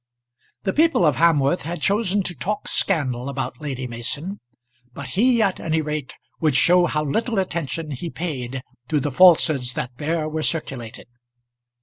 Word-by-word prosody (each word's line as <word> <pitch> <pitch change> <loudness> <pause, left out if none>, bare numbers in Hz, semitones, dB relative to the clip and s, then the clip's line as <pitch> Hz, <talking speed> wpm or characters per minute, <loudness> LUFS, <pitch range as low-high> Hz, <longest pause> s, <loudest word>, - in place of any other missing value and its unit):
The 190 - 0
people 320 - +3
of 150 -5 +3
Hamworth 160 0 +3
had 170 +2 -5
chosen 200 +3 +1
to 180 - -2
talk 195 +9 -3
scandal 135 -8 0
about 140 +2 -4
Lady 135 -3 -4
Mason, 135 - -5 0.5
but 140 +1 -7
he 235 +3 +3
at 195 -3 0
any 160 0 0
rate 150 -3 -4 0.2
would 155 -4 +2
show 175 +6 +5
how 150 0 -1
little 225 - -1
attention 165 -4 -2
he 145 +5 -5
paid 130 -7 -4 0.3
to 155 - +2
the 145 +1 -2
falsehoods 155 -6 +5
that 125 - -3
there 155 +1 -1
were 155 0 -3
circulated. 135 -8 -3
155 Hz, 155 wpm, -22 LUFS, 135-180 Hz, 0.5 s, show